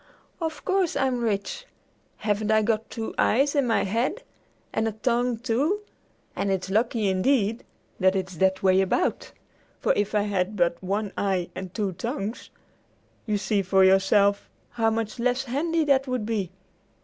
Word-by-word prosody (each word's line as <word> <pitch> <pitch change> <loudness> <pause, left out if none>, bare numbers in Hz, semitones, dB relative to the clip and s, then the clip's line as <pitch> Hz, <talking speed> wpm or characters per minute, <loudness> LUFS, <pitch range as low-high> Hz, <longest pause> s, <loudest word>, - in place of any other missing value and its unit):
"Of 320 -2 -4
course 380 -3 +1
I'm 255 -2 0
rich. 200 -3 -2 0.5
Haven't 210 0 -1
I 220 0 +4
got 225 0 0
two 225 -2 -5
eyes 275 +5 +3
in 280 -4 +2
my 225 - +2
head, 235 - -1 0.5
and 220 - 0
a 220 - -2
tongue, 240 +2 0
too, 260 - 0 0.5
and 200 - -1
it's 190 -1 -1
lucky, 220 0 +1
indeed, 215 +3 +1 0.4
that 190 0 +3
it's 190 -2 -3
that 190 +2 +1
way 190 0 +5
about, 190 - 0 0.5
for - - +2
if 205 +1 -1
I 205 - +3
had 200 0 -1
but 170 -2 +1
one 200 +2 -2
eye 190 -3 -1
and 185 -1 -7
two 205 -1 -2
tongues, 225 - -5 0.8
you 210 -1 +1
see 205 0 0
for 190 0 +3
yourself 200 +1 +3 0.2
how 225 -2 +1
much 225 +1 -3
less 250 +2 +1
handy 315 +6 0
that 275 -1 +3
would 255 -4 -2
be! 210 -5 -2
215 Hz, 160 wpm, -25 LUFS, 195-245 Hz, 0.8 s, way